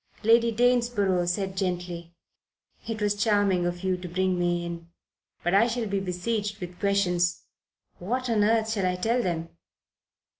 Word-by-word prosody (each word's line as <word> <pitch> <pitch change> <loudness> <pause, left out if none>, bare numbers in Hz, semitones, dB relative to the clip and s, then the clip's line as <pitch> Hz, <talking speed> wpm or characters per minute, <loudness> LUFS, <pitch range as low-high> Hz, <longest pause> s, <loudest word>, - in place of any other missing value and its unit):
Lady 230 +1 +5
Danesborough 230 -6 +2
said 190 +1 -1
gently: 175 -3 -3 0.7
"It 225 -1 -3
was 205 0 +2
charming 205 -4 +2
of 175 +1 -4
you 185 -1 +1
to 180 0 -7
bring 185 +1 0
me 175 0 0
in. 170 -1 -7 0.6
But 175 - 0
I 205 +4 +5
shall 235 -1 -2
be 200 -1 -1
besieged 205 +3 -2
with 180 0 -8
questions. 180 -3 +1 0.6
What 250 +8 -2
on 220 -3 +2
earth 220 +1 +2
shall 200 -4 0
I 180 - 0
tell 230 +7 +1
them?" 165 -4 -2
195 Hz, 155 wpm, -26 LUFS, 175-220 Hz, 0.7 s, Lady